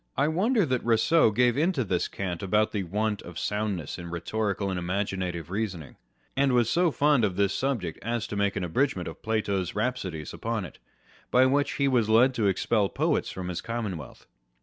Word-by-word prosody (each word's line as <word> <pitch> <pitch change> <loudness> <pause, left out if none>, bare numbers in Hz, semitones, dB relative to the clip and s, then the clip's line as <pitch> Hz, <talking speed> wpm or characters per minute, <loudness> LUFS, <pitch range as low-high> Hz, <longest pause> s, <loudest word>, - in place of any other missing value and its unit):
I 150 - +3
wonder 205 +6 +2
that 130 -4 0
Eousseau 115 +5 +4
gave 120 +2 +3
in 160 +6 +2
to 135 -7 0
this 90 -4 0
cant 90 -3 -4
about 105 +3 +2
the 105 - -1
want 105 +3 -1
of 85 -1 -10
sound 105 -1 -1
ness 80 0 -6
in 85 -1 -7
rhetorical 100 +3 -2
and 90 - -2
imaginative 90 -2 -3
reasoning; 95 - -4 0.4
and 135 -1 +2
was 120 -2 +3
so 175 0 +3
fond 145 -4 +3
of 95 -4 +1
this 100 0 +2
subject 115 - -2
as 115 +1 -2
to - - -6
make 100 -1 +1
an 100 - -2
abridgment 130 - 0
of - - -8
Plato's 100 -5 -1
rhapsodies 105 - -3
upon 115 -4 -3
it, - - -12 0.5
by 125 +1 +5
which 140 +2 +2
he 140 - +1
was 120 -5 +2
led 120 +4 +5
to 110 -5 +1
expel 100 +1 +1
poets - - 0
from 90 -1 -6
his 90 -2 -3
commonwealth. 105 - -5
105 Hz, 195 wpm, -27 LUFS, 95-125 Hz, 0.5 s, by